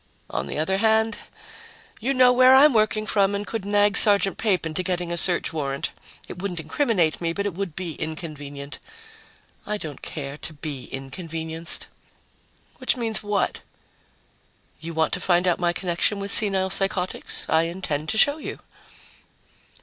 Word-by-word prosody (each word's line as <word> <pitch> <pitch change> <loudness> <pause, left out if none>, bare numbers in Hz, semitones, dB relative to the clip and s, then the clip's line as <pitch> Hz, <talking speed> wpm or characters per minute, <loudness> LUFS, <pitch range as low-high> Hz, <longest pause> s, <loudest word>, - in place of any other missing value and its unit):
On - - -3
the - - -5
other 190 +5 0
hand, 220 0 +2 0.8
you 255 +5 -1
know 255 -2 +5
where 255 +1 +7
I'm 285 +1 +7
working 215 -1 +2
from 200 -2 +2
and 205 +1 -3
could 220 -3 -5
nag 205 0 +3
Sergeant 200 -2 +6
Pape 195 -6 +1
into 160 +3 -1
getting 180 -2 -2
a - - -1
search 170 -1 +1
warrant. 140 -3 -3 0.4
It 180 - -8
wouldn't 185 -4 -3
incriminate 170 - 0
me, 165 -1 -1
but 200 +3 -3
it 205 - -2
would 180 -3 -5
be 180 -3 -4
inconvenient. 145 -2 -7 0.8
I 210 0 -3
don't 155 -8 -7
care 140 -2 -6
to 160 - -8
be 145 -4 -6
inconvenienced." 160 +4 -3 0.9
"Which 255 0 +1
means 225 -2 +1
what?" 205 -1 -1 1.2
"You 165 +1 -7
want 160 0 +1
to 180 - +1
find 180 0 +2
out 175 - +2
my 175 -1 +2
connection 175 +3 0
with 200 0 -4
senile 190 -3 +1
psychotics. 195 -1 -1
I 160 +1 +3
intend 160 -4 -4
to 220 - -1
show 285 +6 +4
you." - - -6
185 Hz, 160 wpm, -24 LUFS, 160-205 Hz, 1.2 s, where